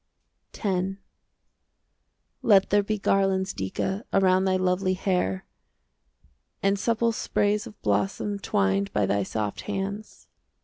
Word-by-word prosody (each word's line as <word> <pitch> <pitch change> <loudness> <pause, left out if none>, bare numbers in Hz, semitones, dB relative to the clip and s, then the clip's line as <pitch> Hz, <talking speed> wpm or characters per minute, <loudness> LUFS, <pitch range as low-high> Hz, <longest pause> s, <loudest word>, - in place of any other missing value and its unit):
X 195 -2 -1 1.5
Let 200 -4 +4
there 205 0 +5
be 215 +1 -2
garlands, 195 -1 +1
Dica, 190 - -3
Around 190 -1 +3
thy 190 -1 +2
lovely 185 0 +1
hair. 180 - -1 1.2
And 195 0 +2
supple 230 +1 +1
sprays 210 -1 0
of 210 - -13
blossom 105 - 0
Twined 100 - 0
by 105 -1 +2
thy 100 +1 +1
soft 105 +1 -3
hands. 200 +1 -5
190 Hz, 115 wpm, -26 LUFS, -, 1.5 s, there